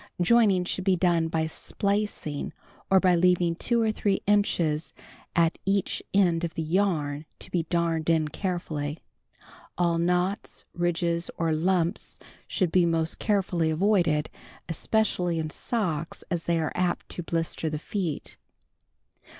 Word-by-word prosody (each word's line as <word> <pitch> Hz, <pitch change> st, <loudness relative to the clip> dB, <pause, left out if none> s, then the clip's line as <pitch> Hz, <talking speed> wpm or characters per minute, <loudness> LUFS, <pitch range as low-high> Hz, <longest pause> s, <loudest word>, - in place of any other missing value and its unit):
Joining 195 Hz, -1 st, +4 dB
should 185 Hz, -, -2 dB
be 190 Hz, -1 st, +3 dB
done 170 Hz, -2 st, +2 dB
by 160 Hz, -1 st, 0 dB
splicing 200 Hz, -3 st, -2 dB, 0.4 s
or 195 Hz, -, +6 dB
h)y 185 Hz, -1 st, +4 dB
leaving 175 Hz, -1 st, +3 dB
two 235 Hz, +5 st, +1 dB
or 220 Hz, -, +2 dB
three 205 Hz, -2 st, 0 dB
inches 175 Hz, -6 st, +1 dB, 0.4 s
at 165 Hz, -1 st, +2 dB
eacn 195 Hz, -1 st, +1 dB
end 175 Hz, -4 st, +3 dB
of 170 Hz, -, -3 dB
the 165 Hz, -, -2 dB
yarn 155 Hz, -4 st, 0 dB
to -, -, -10 dB
be 170 Hz, -3 st, -1 dB
darned 170 Hz, -2 st, 0 dB
in 160 Hz, -2 st, +3 dB
carefully. 155 Hz, -4 st, -3 dB, 0.8 s
All 170 Hz, -1 st, +2 dB
knots, 180 Hz, +4 st, -1 dB
ridges 170 Hz, 0 st, 0 dB
or 165 Hz, -1 st, +1 dB
lumps 175 Hz, +3 st, 0 dB, 0.3 s
should 185 Hz, -6 st, 0 dB
be 180 Hz, 0 st, +4 dB
most 165 Hz, -1 st, 0 dB
carefully 185 Hz, -6 st, +1 dB
avoided, 165 Hz, -3 st, +2 dB, 0.4 s
especially 180 Hz, 0 st, 0 dB
in 155 Hz, -1 st, -2 dB
socks, 170 Hz, -9 st, -2 dB
as 170 Hz, -1 st, -2 dB
they 170 Hz, -1 st, +1 dB
are 155 Hz, -, -1 dB
apt 180 Hz, -1 st, -1 dB
to -, -, -3 dB
blister 165 Hz, -1 st, -2 dB
the 155 Hz, -, -3 dB
feet. 165 Hz, -1 st, -4 dB
170 Hz, 140 wpm, -27 LUFS, 160-190 Hz, 0.8 s, or